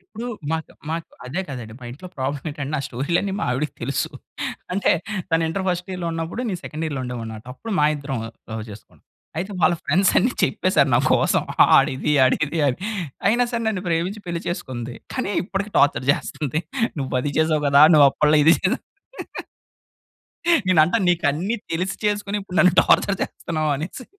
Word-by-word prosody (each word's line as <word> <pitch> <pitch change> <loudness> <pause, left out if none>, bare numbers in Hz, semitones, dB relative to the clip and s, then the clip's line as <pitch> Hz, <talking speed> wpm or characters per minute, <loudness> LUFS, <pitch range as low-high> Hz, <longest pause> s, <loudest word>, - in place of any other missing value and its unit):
ఇప్పుడూ 235 +3 -4 0.2
మాకు 160 -1 -3 0.2
మాకు 165 +1 -4 0.2
అదే 150 +9 -2
కదండి 120 -5 -7
మా 125 - -10
ఇంట్లో 165 +9 -10
ప్రాబ్లమ్ 135 +2 -3
ఏంటంటే 145 -2 -5
నా - - +1
స్టోరీలన్నీ 170 +11 -1
మా - - 0
ఆవిడకి 135 +4 -2
తెలుసు. 135 +2 -1 0.6
అంటే 195 - +2 0.4
తను 165 0 +3
ఇంటర్ 190 +4 -2
ఫస్ట్ 180 0 -1
ఇయర్‌లో 180 -2 -4
ఉన్నప్పుడు 165 +7 -4
నేను 180 -3 -3
సెకండ్ 155 +2 -4
ఇయర్‌లో 140 -4 -3
ఉండేవాన్నిమాట. 115 -3 -6
అప్పుడు 225 - -7
మా 150 - +4
ఇద్దరం 140 -2 -4 0.4
లవ్ 110 -1 -4
చేసుకున్నాం. 105 0 -14 0.4
అయితే 190 +5 -3
వాళ్ళ 175 +2 +4
ఫ్రెండ్స్ 190 +1 +3
అన్ని 245 - +2
చెప్పేసారు. - - +2
నా - - +5
కోసం - - +3 0.2
వాడిది, 135 +3 +5
ఆడిది 155 +5 +1
అని. 125 - -2 0.5
అయినా 240 +3 +3
సరే 235 -1 -1
నన్ను 200 -5 -2
ప్రేమించి 180 +5 -1
పెళ్లి 170 -1 -3
చేసుకుంది. 125 -8 -5 0.2
కానీ 255 -6 -2
ఇప్పటికి 200 +2 -4
టార్చర్ 140 -2 +3
చేస్తుంది. 150 +1 -3 0.4
నువ్వు 135 - -4
అది 145 +2 -2
చేసావు 155 -1 +2
కదా! 140 +1 +6
నువ్వు 145 -2 +8
అప్పట్లో 150 +2 +3
ఇది 165 +2 +7
చేసావు. 185 - 0 1.8
నేనంటా 180 +4 +4
నీకన్ని 175 +5 +1
తెలిసి 180 +4 -1
చేసుకొని 205 0 0
ఇప్పుడు 190 -2 -7
నన్ను 180 -2 +6
టార్చర్ 200 +3 +3
చేస్తున్నావనేసి. 155 - -3
160 Hz, 160 wpm, -22 LUFS, 140-185 Hz, 1.8 s, నువ్వు